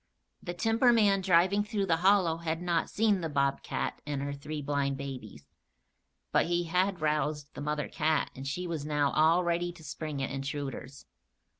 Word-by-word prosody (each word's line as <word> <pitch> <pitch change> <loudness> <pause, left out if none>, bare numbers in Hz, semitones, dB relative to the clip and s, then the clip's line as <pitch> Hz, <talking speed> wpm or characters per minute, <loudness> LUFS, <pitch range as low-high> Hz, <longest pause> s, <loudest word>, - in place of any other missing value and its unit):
The 175 -1 -5
timberman 225 -1 +3
driving 190 +2 +3
through 205 -1 -1
the 165 -3 +2
hollow 185 -2 +3
had 165 -1 -3
not 170 -2 0
seen 210 -3 +2
the 165 - -2
bobcat 140 -1 -1
and 145 -2 -3
her 140 0 -3
three 150 +2 -6
blind 140 -1 -1
babies; 125 - -8 0.9
but - - +3
he 175 0 +1
had 180 +1 0
roused 150 -1 -1
the - - -7
mother 150 0 -2
cat 155 0 0
and 135 +1 -7
she 180 +6 -3
was 165 -4 -3
now 145 -1 +1
all 160 +3 +4
ready 175 0 0
to 170 -2 -15
spring 150 0 -5
at 135 - -3
intruders. 140 0 -5
160 Hz, 170 wpm, -30 LUFS, 140-180 Hz, 0.9 s, all